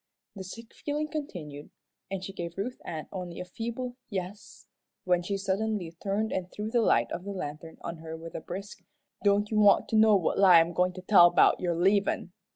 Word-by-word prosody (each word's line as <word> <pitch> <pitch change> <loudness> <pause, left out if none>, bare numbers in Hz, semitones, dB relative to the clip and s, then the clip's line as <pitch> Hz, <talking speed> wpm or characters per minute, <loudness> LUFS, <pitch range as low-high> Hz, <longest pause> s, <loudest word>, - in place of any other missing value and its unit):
The 195 - -6
sick 225 +5 -10
feeling 300 +1 -3
continued, 160 - -6 0.4
and 190 -1 -4
she 195 - -6
gave 170 -2 -6
Ruth 245 +6 -4
Ann 155 -2 -6
only 180 -3 -6
a 180 - -5
feeble 235 +6 -5
"yes," 195 0 -6 0.4
when 180 -1 +2
she 195 +3 -2
suddenly 195 -2 -2
turned 210 +3 -1
and 180 -1 -3
threw 210 +1 -5
the 240 - +3
light 120 - +2
of 175 - -4
the 200 - -7
lantern 160 -3 -6
on 170 0 -6
her 160 0 -7
with 165 +1 -9
a - - -5
brisk, 195 +5 -7 0.4
"Don't 205 +1 +2
you 215 - +2
want 205 -1 +5
to - - -1
know 215 -1 +6
what 185 -1 +1
lie 185 -4 +8
I'm 165 +1 +1
goin' 180 +1 +1
to 185 0 -9
tell 185 -3 +7
'bout - - +4
your 175 -2 -1
leavin'? 195 +1 +1
190 Hz, 205 wpm, -28 LUFS, 175-210 Hz, 0.4 s, lie